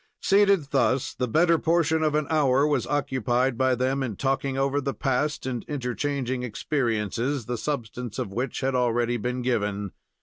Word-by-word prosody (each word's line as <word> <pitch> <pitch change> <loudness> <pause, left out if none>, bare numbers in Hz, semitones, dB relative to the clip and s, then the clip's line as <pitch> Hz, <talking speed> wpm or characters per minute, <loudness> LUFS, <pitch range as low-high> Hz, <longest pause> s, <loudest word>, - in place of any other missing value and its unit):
Seated 195 -7 +3
thus 135 -1 +1
the 125 - -2
better 165 +6 +3
portion 165 -1 +2
of 155 -1 +1
an 150 -1 +1
hour 140 -3 +3
was 145 -5 0
occupied 130 -2 0
by 130 +1 +2
them 130 +2 0
in 120 -6 -3
talking 135 +1 -1
over 135 +1 +1
the 140 0 -3
past 140 +2 -1
and 125 -3 -3
interchanging 130 -1 -2
experiences, 120 0 -1
the 125 - -2
substance 120 -3 -4
of 95 - -4
which 125 +3 -3
had 135 0 0
already 120 -1 +1
been 125 +2 -3
given. 105 -5 -1
130 Hz, 165 wpm, -26 LUFS, 120-145 Hz, -, Seated